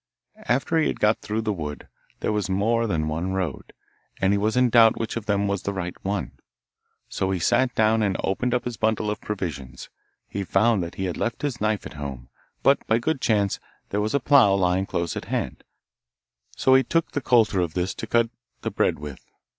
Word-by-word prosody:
After 140 +6 +2
he 160 - +2
had - - -3
got 105 +1 +2
through 110 +1 -2
the 110 -1 0
wood, 75 -5 -6 0.3
there - - 0
was 105 -3 -1
more 115 +5 +1
than 80 -6 -1
one 85 +4 -2
road, 95 -3 -3 0.5
and 95 +1 +3
he - - +2
was 110 +4 0
in 125 -1 +4
doubt 115 -1 +6
which 115 - -3
of 115 -2 -5
them 100 -1 +1
was 100 -2 -1
the 100 - -3
right 90 -2 -3
one, 100 0 -2 0.8
so 95 - -2
he 95 - 0
sat 120 +8 +2
down 110 +1 +3
and 100 -3 +1
opened 125 +6 0
up 125 - -1
his 120 -2 -4
bundle 110 -1 0
of 105 - -5
provisions. 80 -11 -5 0.4
He 100 - -4
found 95 -2 +1
he 95 - -2
had 90 - -3
left 120 +3 -2
his 135 -6 -2
knife 110 -1 0
at - - -8
home, 65 -3 -6 0.3
but 140 - +4
by 110 - +3
good 140 +3 -1
chance, 100 -5 +1 0.3
there 105 - 0
was 110 +5 -1
a - - +3
plough 130 -7 +5
lying 95 0 +1
close 85 -1 -2
at - - -5
hand, - - -3 0.9
so 130 - +4
he 130 - +7
took 165 +4 0
the 145 - -2
coulter 115 -6 +3
of 85 -3 -3
this 90 +1 -1
to 115 - -6
cut 115 0 +2 0.3
the - - -2
bread - - +1
with. 75 -3 -8
105 Hz, 210 wpm, -24 LUFS, 95-115 Hz, 0.9 s, he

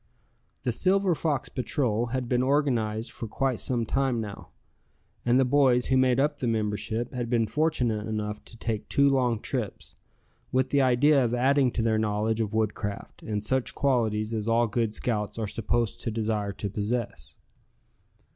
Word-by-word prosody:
The 125 - +1
Silver 190 - +2
Fox 150 -4 -1
Patrol 120 -3 -1
had 125 +1 -2
been 125 0 +1
organized 125 -5 0
for 115 - -6
quite 130 +2 -1
some 120 -3 0
time 135 0 0
now, 105 -3 -7 0.8
and 120 +2 +5
the 135 - +4
boys 125 -2 +3
who 135 - +1
made 130 -1 +3
up 145 +1 +1
the 125 - -1
membership 110 +2 -1
had 120 -2 -3
been 115 -2 +2
fortunate 120 -6 0
enough 105 -1 -3
to 115 - -12
take 110 -2 -3
two 140 0 +4
long 125 -5 +2
trips, - - -4 0.6
with 130 0 +1
the 140 - +4
idea 135 +2 +4
of 120 0 0
adding 135 +1 +3
to 115 - 0
their 110 -1 +2
knowledge 110 +1 0
of 110 0 -2
woodcraft, 105 -2 -3
and 105 -1 -3
such 130 +2 -1
qualities 115 -5 +1
as 110 -1 -2
all 115 +1 +3
good 115 0 -1
scouts 105 -3 -2
are 110 - -1
supposed 115 +2 -1
to - - -2
desire 110 -2 -1
to 100 +1 -5
possess. 105 +4 -3
120 Hz, 170 wpm, -27 LUFS, 110-130 Hz, 0.8 s, and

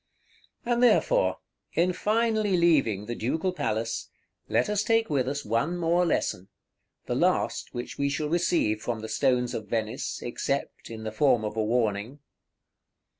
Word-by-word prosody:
And 240 0 +1
therefore, - - +3 0.4
in 180 +2 +2
finally 215 -1 +1
leaving 135 - +3
the 120 - -4
Ducal 160 +11 -1
Palace, 115 -8 -2 0.4
let - - +2
us 210 -1 +1
take 225 -3 +1
with 130 -3 +1
us 140 +1 -3
one 115 +11 0
more 175 +1 +2
lesson, 95 - -1 0.6
the - - -2
last - - 0
which 120 - -6
we 140 0 +1
shall 145 +2 -2
receive 165 -10 +1
from 115 -1 -3
the 110 - -5
Stones 125 +1 +1
of 110 - -5
Venice, 110 -1 -2
except 135 +3 -3
in 110 -1 -7
the 110 - -4
form 120 -2 +2
of 105 - -4
a 110 - 0
warning. 110 +2 0
135 Hz, 155 wpm, -27 LUFS, 110-175 Hz, 0.6 s, therefore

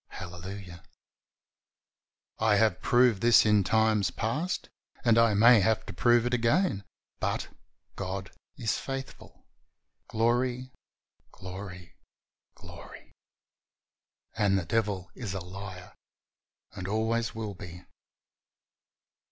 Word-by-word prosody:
Hallelujah! 90 0 -8 1.6
I 110 -1 +3
have 105 -3 +2
proved 120 -5 +3
this 120 -1 +6
in 105 -2 +4
times 110 0 +2
past, 150 +11 -2 0.4
and 115 -2 +5
I 115 -2 +4
may 115 +2 +7
have 110 +2 +1
to - - -7
prove 120 -1 +3
it 125 - -1
again, 120 - +1 0.4
but - - -2 0.5
"God 95 0 -5 0.3
is 115 -4 -1
faithful." 135 0 -8 0.6
Glory! 125 +3 0 0.6
Glory! 90 -1 -9 0.6
Glory! - - -13 1.2
And 100 -2 +2
the 90 - -2
devil 100 -1 -1
is 105 -7 -5
a - - -2
liar 95 0 -9 0.8
and 95 - -7
always 110 +2 -1
will 110 -2 -4
be. 90 -2 -10
110 Hz, 105 wpm, -28 LUFS, 95-115 Hz, 1.6 s, may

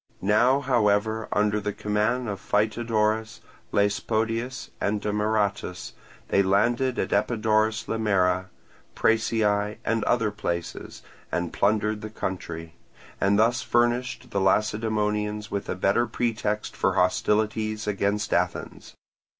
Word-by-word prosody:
Now, 120 +7 +4
however, 110 -4 +1
under 105 0 +2
the 105 0 -3
command 105 +5 0
of 100 -2 -4
Phytodorus, 110 0 0 0.3
Laespodius, 115 +4 -1
and 105 +1 0
Demaratus, 105 -2 -1 0.4
they 100 - +4
landed 120 +7 +2
at - - -1
Epidaurus 110 0 +1
Limera, 95 -4 +1 0.5
Prasiae, 105 -2 +1
and 115 -1 +1
other 115 -3 +2
places, 85 -5 -5 0.3
and 85 -1 -2
plundered 105 +1 +1
the 110 - -6
country; 85 -6 -5 0.5
and 100 +1 +3
thus 120 +3 +3
furnished 120 0 0
the 100 - 0
Lacedaemonians 105 +1 0
with 100 0 -3
a - - -1
better 100 +6 +2
pretext 110 -2 -2
for - - +1
hostilities 110 +3 +1
against 105 0 -1
Athens. - - -2
105 Hz, 110 wpm, -25 LUFS, 100-115 Hz, 0.5 s, Now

